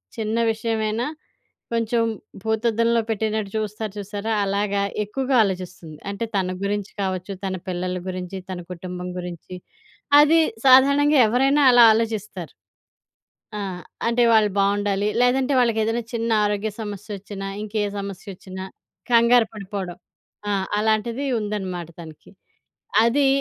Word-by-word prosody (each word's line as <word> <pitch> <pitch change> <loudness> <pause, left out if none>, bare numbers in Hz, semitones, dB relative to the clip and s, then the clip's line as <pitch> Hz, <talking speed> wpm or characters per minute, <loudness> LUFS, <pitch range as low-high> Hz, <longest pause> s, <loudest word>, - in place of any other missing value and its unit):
చిన్న 220 0 -2
విషయమైనా 220 +1 -1 0.7
కొంచెం 230 0 +1 0.4
భూతద్దంలో 230 +1 +1
పెట్టినట్టు 215 -2 -1
చూస్తారు 215 -1 -4
చూసారా? 205 +2 -4
అలాగా 200 0 0 0.2
ఎక్కువగా 260 +5 -1
ఆలోచిస్తుంది. 180 -5 -5
అంటే 200 +3 -3
తన 185 -1 0
గురించి 205 0 -2
కావచ్చు, 185 0 -3
తన 190 -1 -2
పిల్లల 180 0 -2
గురించి, 185 +1 -5
తన 180 - -5
కుటుంబం 180 0 -6
గురించి, 180 0 -7 0.7
అది 315 +3 +5 0.3
సాధారణంగా 280 +2 +6
ఎవరైనా 270 +6 +3
అలా 245 -1 +8
ఆలోచిస్తారు. 215 -5 -3 1.1
ఆ! - - -3 0.5
అంటే 235 +1 +3
వాళ్ళు 215 -1 +5
బాగుండాలి. 200 0 +1
లేదంటే 260 +2 +2
వాళ్ళకేదైనా 230 -1 +1
చిన్న 230 0 -1
ఆరోగ్య 205 +1 0
సమస్యొచ్చినా, 205 -1 -6
ఇంకే 215 0 -2 0.2
సమస్యొచ్చినా 190 -1 -7 0.5
కంగారు 235 -1 +5
పడిపోవడం. 195 -3 -6 0.5
ఆ! - - +1 0.3
అలాంటిది 220 +5 0
ఉందన్నమాట 190 -5 -4
తనకి. 160 -2 -12 0.7
అదీ 275 +5 +3
210 Hz, 110 wpm, -23 LUFS, 195-230 Hz, 1.1 s, అలా